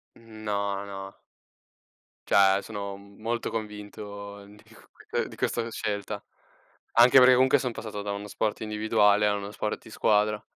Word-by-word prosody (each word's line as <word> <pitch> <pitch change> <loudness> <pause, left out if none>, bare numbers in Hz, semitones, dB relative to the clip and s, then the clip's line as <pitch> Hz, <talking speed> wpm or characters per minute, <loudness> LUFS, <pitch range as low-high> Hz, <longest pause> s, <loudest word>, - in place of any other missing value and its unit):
No, 105 -3 -4
no. 95 0 -8 1.1
Cioè, 100 0 +5
sono 100 -2 -6
molto 105 +4 -5
convinto 105 -2 -7
di 105 +1 -17
q - - -20
q - - -21
uhm, - - +2
di - - -10
questa 115 -1 -1
scelta. 105 -1 -4 0.7
Anche 120 +3 +7
perché 125 0 +8
comunque 130 +2 +5
sono 125 -2 -2
passato 110 -2 -6
da 100 0 -4
uno 100 +1 -5
sport 105 +1 -2
individuale 105 -1 +3
a 105 - +2
uno 100 0 -5
sport 105 0 -3
di - - -14
squadra 105 0 +2
105 Hz, 155 wpm, -27 LUFS, 100-110 Hz, 1.1 s, perché